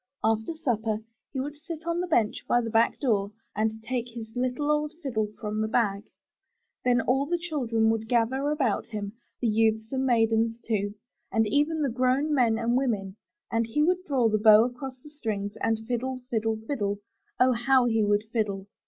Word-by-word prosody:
After 220 +7 +1
supper 225 -8 -1 0.3
he 270 - -3
would 285 +3 -3
sit 320 +2 -8
on 335 0 0
the 360 - -2
bench 230 -10 +1
by 240 - +4
the 230 -2 -3
back 225 +1 +3
door 205 -7 +1 0.2
and 220 +1 -1
take 245 +1 -2
his 230 -1 -9
little 255 +4 0
old 300 +1 0
fiddle 220 -6 0
from 215 0 -2
the 220 - 0
bag. 210 -3 0 0.8
Then 245 -1 +3
all 270 +4 +1
the 345 +2 +1
children 245 -10 +1
would 225 0 -3
gather 255 +4 +1
about 275 -8 0
him, 205 -2 -5 0.3
the 240 - +2
youths 220 0 +1
and 265 -1 0
maidens, 225 -2 +2
too, 205 -3 -2 0.4
and 225 0 +3
even 295 +7 +1
the 280 - +1
grown 255 +5 +1
men 235 -5 +3
and 235 +2 +1
women; 210 -8 0 0.4
and 230 0 +1
he 295 +7 +1
would 365 +3 +2
draw 260 -6 +3
his 215 -1 +1
bow 215 0 +8
across 255 +2 -5
the 300 - -12
strings 210 -8 -3
and 225 0 0
fiddle, 255 +1 -2
fiddle, 225 -1 0
fiddle! 205 -7 -1 0.4
Oh, 255 +1 +5
how 250 +1 +3
he 225 -2 +2
would 205 0 +2
fiddle! 200 -4 -1
230 Hz, 190 wpm, -27 LUFS, 220-265 Hz, 0.8 s, bow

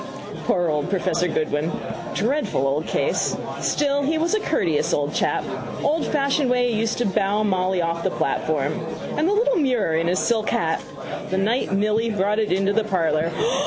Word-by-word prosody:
Poor 175 -2 +2
old 150 +2 -1
professor 180 -2 +1
Goodwin. 155 0 -1 0.4
Dreadful 230 - 0
old 145 +4 0
case. - - 0 0.2
Still 285 -1 +1
he 305 +3 +1
was 335 +5 +1
a 430 - +3
courteous 170 - 0
old 145 +1 -1
chap. - - +1 0.4
Oldfashioned 285 -2 +1
way 245 -1 +2
he 215 - 0
used 225 0 0
to 245 - 0
bow 200 +2 +1
Molly 185 -2 +1
off 170 0 -2
the - - +2
platform. 150 -1 0 0.4
And 315 +4 +2
the - - +2
little 480 +3 +2
mirror 250 - +1
in 165 +1 +1
his 180 +2 +1
silk 220 -2 +1
hat. 160 -1 0 0.5
The 190 - -1
night 215 +2 +1
Milly 215 +3 +1
brought 210 0 +1
it 215 - 0
into 195 +2 +2
the 225 +1 +2
parlour. 165 -5 +1
205 Hz, 175 wpm, -23 LUFS, 170-250 Hz, 0.5 s, a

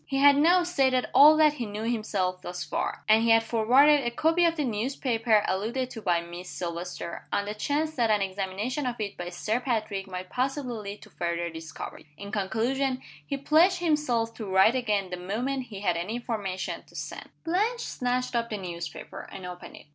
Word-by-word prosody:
He 270 - -1
had 280 +1 +7
now 345 +5 +5
stated 265 -7 +2
all 305 +2 +8
that 305 -1 +5
he 250 -5 -4
knew 210 +1 -5
himself 205 -6 -1
thus 180 -1 -5
far - - -3
and 220 +1 +6
he 230 - +2
had 225 0 +6
forwarded 255 +6 +5
a 240 - 0
copy 325 +8 +2
of 335 0 +2
the 305 - -1
newspaper 230 -2 +1
alluded 235 +7 -1
to 225 - -7
by 175 -4 +2
Miss 175 +1 -9
Silvester, 170 0 -5
on 200 - 0
the 205 - -3
chance 295 +8 -1
that 235 -2 +2
an 210 -1 +4
examination 200 +7 -2
of 240 -1 -3
it 205 -2 -3
by 175 0 -5
Sir 210 +6 -1
Patrick 215 -6 -2
might 185 -1 -7
possibly 260 0 -1
lead 210 -2 -7
to - - -16
further 170 0 -2
discoveries. 160 -1 -8
In 200 0 -8
conclusion, 235 +6 0 0.2
he 275 - -3
pledged 320 +7 +4
himself 295 -9 +1
to 220 - -5
write 190 +4 +5
again 210 -7 0
the 180 - -3
moment 245 +9 -2
he 200 -3 -8
had 180 -4 +1
any 180 +7 -3
information 210 -6 -3
to - - -19
send. - - -6
Blanche 425 +9 0
snatched 250 0 -2
up 235 0 0
the 215 - -3
newspaper, 175 -3 -7
and 190 - -8
opened 180 0 -8
it. - - -14
225 Hz, 200 wpm, -27 LUFS, 190-270 Hz, 0.2 s, all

